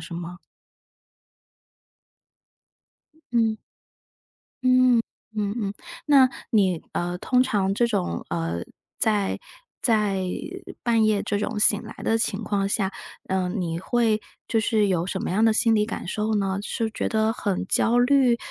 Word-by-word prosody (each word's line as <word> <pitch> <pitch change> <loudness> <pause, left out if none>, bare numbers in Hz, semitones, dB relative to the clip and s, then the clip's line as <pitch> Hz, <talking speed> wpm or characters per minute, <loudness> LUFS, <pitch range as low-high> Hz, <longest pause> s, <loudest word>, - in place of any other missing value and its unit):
是 165 +2 -9
吗？ 175 +1 -6 2.9
嗯， 225 -2 +2 1.8
嗯， 205 -1 -1
嗯 - - -5
嗯， 200 - -4 0.3
那 275 -4 +6 0.2
你， 190 -6 +2
呃， 175 +1 -2
通 250 +6 +2
常 195 -4 0
这 240 - +2
种， 185 - -2
呃， 85 0 -2 0.4
在 210 -3 +1 0.4
在 210 -5 +2 0.6
半 230 -2 +3
夜 215 -2 +2
这 205 - -1
种 210 +1 -2
醒 210 0 +4
来 220 - -9
的 225 - +2
情 220 -1 -1
况 200 -1 0
下， 195 -2 0 0.4
嗯， 190 +1 -1
你 165 -1 -2
会 220 0 +1 0.3
就 225 - +1
是 215 -1 +2
有 175 -3 0
什 190 0 -3
么 - - -3
样 215 +4 +2
的 225 - +5
心 225 +1 +3
理 210 -1 +2
感 215 -5 -5
受 215 +2 -1
呢？ 195 -1 0
是 220 +2 -2
觉 200 - -2
得 220 0 +1
很 200 -4 -2
焦 235 +5 +2
虑？ 245 -1 +4
210 Hz, 150 characters per minute, -24 LUFS, 190-225 Hz, 2.9 s, 那